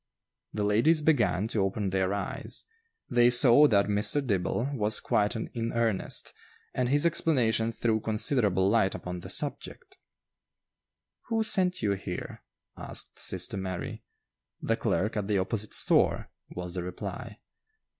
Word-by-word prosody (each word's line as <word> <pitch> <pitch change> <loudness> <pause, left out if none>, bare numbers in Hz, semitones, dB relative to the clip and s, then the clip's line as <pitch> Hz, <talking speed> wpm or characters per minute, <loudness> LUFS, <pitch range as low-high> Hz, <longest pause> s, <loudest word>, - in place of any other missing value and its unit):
The 105 - -3
ladies 115 +11 +3
began 120 - +1
to 110 - 0
open 95 0 -1
their 95 0 0
eyes; 130 +7 -5 0.4
they 120 -1 +4
saw 125 +4 +6
that 100 -6 +3
Mr. 105 +8 0
Dibble 115 +5 -1
was 105 -4 +1
quite 105 +3 0
in 115 +1 -4
earnest, 115 -4 -1 0.4
and 125 -1 -1
his 145 +4 +2
explanation 120 -9 +2
threw 110 -1 0
considerable 105 -3 +1
light 105 -2 +2
upon 90 0 -6
the - - -10
subject. - - -5 1.3
"Who 225 -1 0
sent 185 - +2
you 105 - +1
here?" 95 -2 -5 0.3
asked - - -6
sister - - -1
Mary. 95 -2 -5 0.6
"The - - 0
clerk 105 +4 -1
at 100 -2 -2
the 105 -2 +1
opposite 100 +3 -2
store," - - +2 0.2
was 90 -1 -6
the 90 - -3
reply. 90 0 -7
110 Hz, 135 wpm, -28 LUFS, 100-125 Hz, 1.3 s, saw